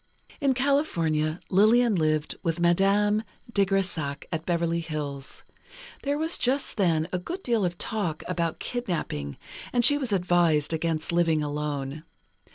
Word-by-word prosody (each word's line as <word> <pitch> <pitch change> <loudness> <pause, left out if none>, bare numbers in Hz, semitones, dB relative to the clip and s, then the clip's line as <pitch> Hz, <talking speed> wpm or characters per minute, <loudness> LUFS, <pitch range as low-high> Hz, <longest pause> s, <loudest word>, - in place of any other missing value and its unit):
In 275 -3 +2
California, 170 - +1
Lillian 220 +4 +5
lived 155 -3 0
with 170 -2 -1
Madame 195 +5 +3 0.3
de 200 -1 +3
Grésac, 180 -7 -1
at 160 -1 -4
Beverly 170 -1 +1
Hills. 150 -4 -4 0.6
There 285 +1 -1
was 320 +2 0
just 265 +1 0
then 165 -5 +2
a 180 - 0
good 355 - -6
deal 235 -4 +1
of 175 -1 -1
talk 180 -8 -2
about 170 -3 -1
kidnapping, 170 - -4 0.3
and 240 -1 +4
she 290 +3 +6
was 260 -6 -3
advised 175 -5 +2
against 160 0 -1
living 165 -3 +2
alone. 145 0 -3
175 Hz, 140 wpm, -26 LUFS, 155-215 Hz, 0.6 s, she